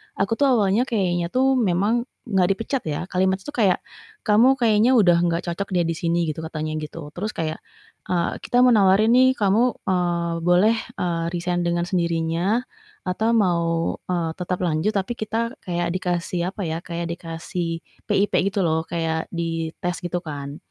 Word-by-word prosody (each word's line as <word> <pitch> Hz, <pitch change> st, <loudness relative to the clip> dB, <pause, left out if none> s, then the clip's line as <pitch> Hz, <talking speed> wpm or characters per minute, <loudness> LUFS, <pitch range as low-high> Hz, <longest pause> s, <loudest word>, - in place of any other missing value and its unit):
aku 195 Hz, +3 st, -1 dB
tuh 285 Hz, -, +4 dB
awalnya 230 Hz, 0 st, +3 dB
kayaknya 175 Hz, -6 st, 0 dB
tuh 260 Hz, +5 st, +2 dB
memang 215 Hz, +4 st, +1 dB, 0.2 s
gak 190 Hz, -6 st, +2 dB
dipecat 225 Hz, +7 st, -1 dB
ya 150 Hz, +4 st, -3 dB
kalimat 190 Hz, +1 st, +2 dB
tuh 295 Hz, -, -8 dB
kayak 205 Hz, -8 st, +3 dB, 0.5 s
"Kamu 240 Hz, +5 st, +5 dB
kayaknya 230 Hz, +1 st, +4 dB
udah 175 Hz, -5 st, +5 dB
gak 170 Hz, +1 st, -1 dB
cocok 200 Hz, +4 st, -3 dB
deh 175 Hz, -1 st, +2 dB
di 165 Hz, -, 0 dB
sini," 170 Hz, +1 st, -1 dB
gitu 155 Hz, -1 st, -3 dB
katanya 155 Hz, -1 st, -4 dB
gitu 150 Hz, +2 st, -8 dB, 0.2 s
terus 200 Hz, +6 st, -3 dB
kayak, 155 Hz, -1 st, -2 dB, 0.5 s
eee, 175 Hz, -2 st, 0 dB
"Kita 245 Hz, +1 st, +3 dB
mau 250 Hz, -, +6 dB
nawarin 205 Hz, +2 st, +5 dB
nih 260 Hz, +1 st, +5 dB
kamu, 205 Hz, +2 st, +3 dB, 0.2 s
eee, 175 Hz, -2 st, 0 dB
boleh, 180 Hz, +6 st, +4 dB, 0.2 s
eee, 170 Hz, -2 st, -1 dB
resign 175 Hz, 0 st, -1 dB
dengan 175 Hz, 0 st, 0 dB
sendirinya 170 Hz, +5 st, 0 dB, 0.4 s
atau 190 Hz, +5 st, 0 dB
mau, 175 Hz, -5 st, +2 dB, 0.4 s
eee, 170 Hz, -3 st, 0 dB
tetap 180 Hz, 0 st, -1 dB
lanjut," 160 Hz, +4 st, +1 dB
tapi 195 Hz, +4 st, -1 dB
kita 230 Hz, +1 st, -2 dB
kayak 175 Hz, -1 st, -2 dB
dikasih 175 Hz, -1 st, -1 dB
apa 195 Hz, -1 st, -5 dB
ya 160 Hz, +1 st, -3 dB
kayak 170 Hz, -1 st, -4 dB
dikasih 165 Hz, 0 st, -5 dB, 0.3 s
PIP 205 Hz, +1 st, +2 dB, 0.2 s
gitu 200 Hz, -2 st, 0 dB
loh 160 Hz, 0 st, +1 dB
kayak 160 Hz, -1 st, -2 dB
di 165 Hz, -1 st, -2 dB
tes 175 Hz, 0 st, -3 dB
gitu 175 Hz, 0 st, -2 dB
kan. 145 Hz, -1 st, -6 dB
180 Hz, 170 wpm, -23 LUFS, 170-210 Hz, 0.5 s, mau